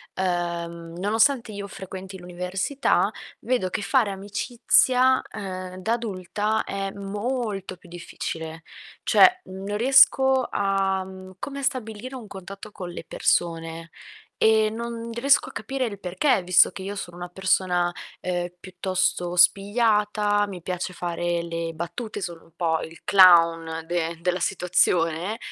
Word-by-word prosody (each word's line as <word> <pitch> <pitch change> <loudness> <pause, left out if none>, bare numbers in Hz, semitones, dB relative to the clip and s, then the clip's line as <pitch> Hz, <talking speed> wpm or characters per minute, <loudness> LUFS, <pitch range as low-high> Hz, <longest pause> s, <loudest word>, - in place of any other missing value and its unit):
ehm, 170 -2 -3
nonostante 225 +5 +2
io 200 0 -6
frequenti 190 0 -8
l'università, 180 +9 0 0.3
vedo 245 -7 -1
che 195 - -3
fare 220 +1 +2
amicizia, 245 +6 +2
ehm, 185 -2 -6
da 220 +5 -1
adulta 215 -1 -2
è 195 0 -3
molto 205 -1 -4
più 180 - -18
difficile. 165 -2 -6 0.4
Cioè, 370 0 +6
non 195 +2 -6
riesco 265 +1 +5
a, 195 -1 0
mhmm, 185 0 -11
come 280 +4 -5
a - - -5
stabilire 250 0 -3
un 245 -4 -8
contatto 195 +2 -10
con 185 -4 -7
le 175 - -7
persone, 165 0 -1 0.5
ehm, 220 -1 +3
non 235 0 -5
riesco 275 +4 +3
a - - -11
capire 265 -1 -3
il 200 -3 -6
perché, 185 +5 +1
visto 180 0 +5
che 190 - -9
io 200 +1 -5
sono 175 -3 -7
una 175 0 -6
persona, 180 -1 +1 0.3
uhm, 175 -1 -2
piuttosto 180 -1 -1
spigliata, 205 +2 +3
mi 185 -3 -8
piace 180 +1 -4
fare 175 0 -2
le 165 0 -4
battute, 205 +7 -5
sono 170 -3 -6
un - - -23
po' 165 -2 0
il 165 +1 -10
clown 165 -4 +5
de 170 -1 -2
della 180 +1 0
situazione, 180 +1 +1
190 Hz, 135 wpm, -24 LUFS, 175-215 Hz, 0.5 s, Cioè